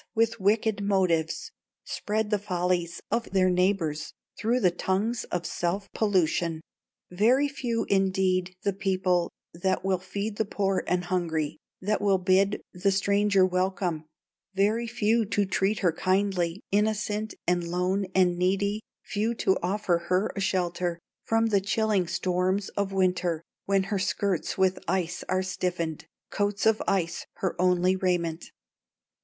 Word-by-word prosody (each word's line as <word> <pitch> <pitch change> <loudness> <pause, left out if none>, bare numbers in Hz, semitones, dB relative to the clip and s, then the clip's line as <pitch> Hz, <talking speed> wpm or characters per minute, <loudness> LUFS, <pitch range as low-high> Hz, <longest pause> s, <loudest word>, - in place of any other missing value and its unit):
with 230 0 +2
wicked 210 +1 +2
motives, 185 -5 +1 0.3
Spread 215 0 -2
the 210 - +2
follies 180 -3 -1
of 235 0 0
their 185 -1 +4
neighbors 180 -4 0 0.2
Through 240 +3 0
the 180 -4 +4
tongues 200 +6 -1
of 175 -1 -3
self 185 +5 -2
pollution. 175 -5 +1 0.5
Very 240 +10 +3
few, 250 -5 -2
indeed, 185 -1 +1
the 200 - +1
people 185 -2 +1 0.2
That 185 +3 -1
will 190 -2 +1
feed 200 +3 -4
the 220 - +1
poor 195 -1 0
and 180 0 +1
hungry, 165 -5 -1 0.2
That 210 +3 0
will 200 -2 +3
bid 190 +2 +2
the 180 +3 +1
stranger 200 0 +3
welcome; 185 -3 -1 0.5
Very 215 +4 +2
few 230 0 +2
to 205 0 +1
treat 195 +2 +1
her 180 -4 +3
kindly, 185 0 0
Innocent, 210 +1 0
and 175 -1 +1
lone, 180 +3 0
and 180 -2 +3
needy, 200 +3 +1 0.2
Few 220 +3 -1
to 190 - +2
offer 185 -1 +1
her 185 +4 +2
a - - -3
shelter 175 -2 0 0.3
From 225 0 +2
the 205 -3 +2
chilling 205 -2 +1
storms 185 +2 0
of 200 -1 -2
winter, 180 -3 +1 0.2
When 195 -1 +2
her 195 0 -2
skirts 200 -2 -1
with 190 -1 +2
ice 180 -2 -1
are 185 0 +1
stiffened, 175 -4 -3 0.2
Coats 205 0 -1
of 220 -1 +4
ice 170 -3 0
her 190 - -2
only 180 0 +3
raiment! 175 -3 -1
190 Hz, 140 wpm, -27 LUFS, 180-205 Hz, 0.5 s, their